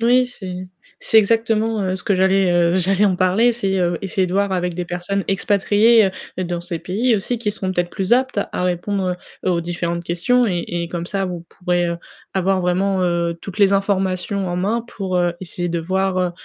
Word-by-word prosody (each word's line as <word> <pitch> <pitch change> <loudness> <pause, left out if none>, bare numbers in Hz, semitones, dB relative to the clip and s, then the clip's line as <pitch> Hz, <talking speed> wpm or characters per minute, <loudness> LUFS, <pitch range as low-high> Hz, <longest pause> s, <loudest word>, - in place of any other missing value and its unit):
Oui, 250 +2 +4
c'est 185 -6 -7 0.4
c'est 220 - +6
exactement, 225 0 +2
heu, 185 0 -1
ce 180 - -7
que 200 - +2
j'allais, 190 0 +3
heu, 175 0 +3
j'allais 190 +2 +2
en 190 -3 +2
parler, 190 +6 +3
c'est, 195 -5 -1
heu, 175 -1 0
essayer 190 -1 0
de 180 - -5
voir 200 0 +1
avec 180 -2 -1
des 180 - -3
personnes 180 +3 -3
expatriées 205 +2 +3 0.3
dans 175 -1 -2
ces 175 -1 -4
pays 225 +9 0
aussi 225 +4 -2
qui 215 -3 -1
seront 190 -2 -3
peut-être 175 -1 -1
plus 190 +4 -1
aptes, 255 -3 +2
à - - -2
répondre 180 +1 -1 0.3
aux 175 -2 +1
différentes 170 0 -3
questions 240 +9 +2
et 175 -5 -1
et 170 -1 -3
comme 170 0 -4
ça 195 0 -1
vous 175 -2 -5
pourrez, 175 -1 -1
heu, 170 - -3 0.4
avoir 190 0 +1
vraiment, 185 +2 +1
heu, 170 -1 0
toutes 195 0 -8
les 200 -1 +5
informations 195 -1 0
en 175 - -2
main 220 +6 -1
pour, 190 -5 -3
heu, 175 -1 +1
essayer 175 -1 -4
de 170 0 -1
voir, 190 +2 0
heu, 180 -1 +1
185 Hz, 205 wpm, -20 LUFS, 175-200 Hz, 0.4 s, c'est